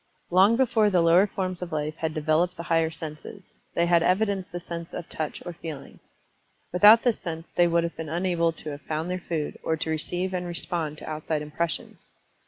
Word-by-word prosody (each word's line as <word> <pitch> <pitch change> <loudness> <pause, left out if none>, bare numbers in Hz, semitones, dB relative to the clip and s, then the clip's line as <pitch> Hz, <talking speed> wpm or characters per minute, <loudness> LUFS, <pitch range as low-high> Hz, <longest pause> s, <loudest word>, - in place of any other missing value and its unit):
Long 190 +5 +6
before 225 -5 +3
the 185 -3 +3
lower 175 +4 +5
forms 185 -2 -3
of 180 - -5
life 155 0 -2
had 160 -1 -2
developed 160 +4 +1
the 170 - -5
higher 165 -1 +2
senses, 160 +4 -9 0.2
they 170 - +3
had 170 -1 +4
evidenced 190 +1 +1
the 175 - -4
sense 170 -1 -7
of 175 - -6
Touch 155 -1 -4
or 175 - -5
Feeling. 160 -4 -9 0.7
Without 210 +5 +8
this 245 -3 +2
sense 165 -2 -5
they 175 - +5
would 170 0 +2
have 170 - -3
been 160 -2 -6
unable 170 0 +1
to 155 -1 -8
have 145 0 -8
found 160 +5 -3
their 185 - -2
food, 160 -4 -3
or 160 - -1
to 160 - -2
receive 175 +4 -2
and 180 -1 -2
respond 170 -3 -3
to - - -9
outside 155 0 -2
impressions. 165 +3 -3
170 Hz, 200 wpm, -26 LUFS, 160-180 Hz, 0.7 s, Without